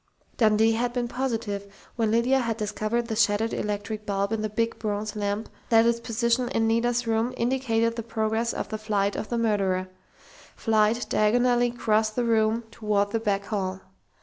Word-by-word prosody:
Dundee 220 0 +4
had 240 +2 -1
been 245 -1 -1
positive, 225 -6 -3 0.2
when 225 -3 +1
Lydia 235 +4 +3
had 230 -3 -1
discovered 215 +2 -1
the 225 -1 -3
shattered 215 +1 +2
electric 210 +1 -3
bulb 200 0 -1
in 225 -1 -1
the 215 - -2
big 230 +2 -1
bronze 210 0 -3
lamp 205 +1 -2 0.2
that 225 0 +5
its 235 0 +2
position 235 +2 0
in 225 -3 +1
Nita's 235 +2 +1
room 225 +2 0
indicated 230 -2 +1
the 230 - -3
progress 225 0 -1
of - - -4
the 215 - -4
flight 205 -2 0
of - - -4
the 235 - -1
murderer 195 -5 0 0.7
flight 220 +1 +2
diagonally 245 +3 +3
across 220 -2 +1
the 240 +3 -2
room 225 0 +2
toward 205 -3 0
the 225 - 0
back 200 -3 -1
hall. 190 -3 -2
225 Hz, 175 wpm, -26 LUFS, 210-235 Hz, 0.7 s, that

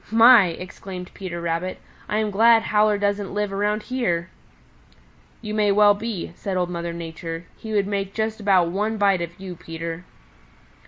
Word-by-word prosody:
"My!" 225 -2 +8
exclaimed 180 +1 -8
Peter 180 -3 -6
Rabbit, 170 +2 -3 0.3
"I 210 - 0
am 215 -1 0
glad 225 +2 +5
Howler 210 0 +3
doesn't 200 -1 -1
live 205 -1 -1
around 210 +2 0
here." 185 -10 -1 1.1
"You 215 -1 -4 0.2
well 205 0 +6
may 205 - -9
be," 220 -7 -4
said 190 +1 -4
Old 180 -1 -1
Mother 170 -1 -3
Nature. 165 0 -6
"He 220 - -8
would 200 -2 +2
make 195 -1 -3
just 220 0 -2
about 190 -5 +3
one 210 +5 -1
bite 200 -3 +3
of 170 +1 -6
you, 190 -2 -7
Peter." 165 0 -6
195 Hz, 165 wpm, -23 LUFS, 175-210 Hz, 1.1 s, My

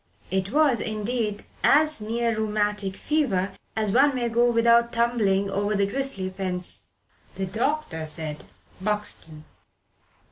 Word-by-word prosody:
It 190 +1 -1
was, 285 -4 +4
indeed, 215 0 -2 0.2
as 305 -3 +4
near 230 +1 -1
rheumatic 210 -2 -1
fever 210 -12 0 0.2
as 215 -2 0
one 275 +4 +4
may 240 -2 0
go 240 +1 +3
without 235 0 +4
tumbling 225 -5 +1
over 205 +2 0
the 200 0 +2
grisly 255 -4 -2
fence. 185 -2 -3 0.5
The 195 - -2
doctor 220 - -2
said 155 -1 -5 0.4
"Buxton." 200 -7 -2
215 Hz, 120 wpm, -25 LUFS, 195-235 Hz, 0.5 s, was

